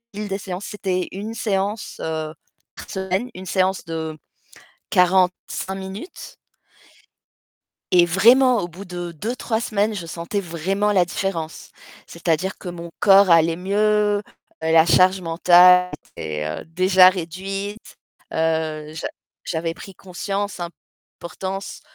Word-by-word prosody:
des 205 -1 -3
séances, 190 0 -6
c'était 190 -4 -2
1 210 +4 -6
séance, 205 -1 -2
heu, 155 -1 -3 0.4
par - - -11
semaine, 190 +5 -2
une 185 +1 -8
séance 185 -1 0
de 160 -1 -5 0.7
45 185 0 +1
minutes 195 - -8 1.6
et 175 -1 +7
vraiment 235 +7 +5
au 175 - -4
bout 185 +4 -10
de 175 -1 -6
2-3 225 +5 -3
semaines, 215 -2 0
je 180 -4 -5
sentais 170 +5 -3
vraiment 195 +4 -1
la 185 -3 +4
différence. 170 -4 -4 0.4
C'est-à-dire 170 +2 -2
que 180 - -8
mon 170 -1 -7
corps 195 -1 +6
allait 165 0 +5
mieux, 210 +2 +1 0.4
la 160 0 +5
charge 185 +2 +4
mentale 180 +2 +6 0.3
était 75 -1 -4 0.2
heu, - - -12
déjà 185 +2 +5
réduite. 195 +4 -5 0.4
Heu, 160 -1 -1
j'a 160 - -4 0.4
j'avais 165 0 -2
pris 195 +2 -11
conscience 195 +1 -4
importance 185 +2 -8
185 Hz, 120 wpm, -22 LUFS, 170-200 Hz, 1.6 s, et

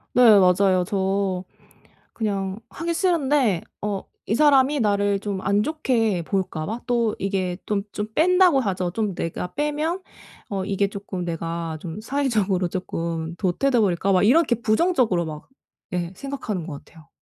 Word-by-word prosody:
네. 230 -4 +8
맞아요. 185 0 +4
저 195 -1 -1 0.7
그냥 195 -3 -2
하기 335 +1 -3
싫은데 290 - +2 0.2
어 205 -2 -2 0.2
이 220 - 0
사람이 285 0 +4
나를 205 -2 +2
좀 200 -2 -4
안 200 +1 +2
좋게 230 - 0
볼까 185 -5 -2
봐? 225 +7 -4
또 235 -3 +1
이게 190 -2 -1
또 205 -2 0
좀 210 - -3
뺀다고 360 -2 +5
하죠. 185 -6 -1
좀 210 -1 -1
내가 170 +2 -4
빼면 300 +4 -1 0.5
어 195 -2 -2
이게 200 +1 +1
조금 195 -2 -6
'내가 165 -1 -3
좀 175 +3 -6
사회적으로 215 -8 0
조금 165 -2 -4
도태돼 230 +8 +1
버릴까?' 195 0 +1
막 185 - +4
이렇게 255 +5 +4
부정적으로 230 - +2
막 155 -1 -8 0.4
예 175 -1 -2
생각하는 220 - -4
것 145 -3 -8
같아요. 160 -3 -18
200 Hz, 280 characters per minute, -23 LUFS, 180-250 Hz, 0.7 s, 네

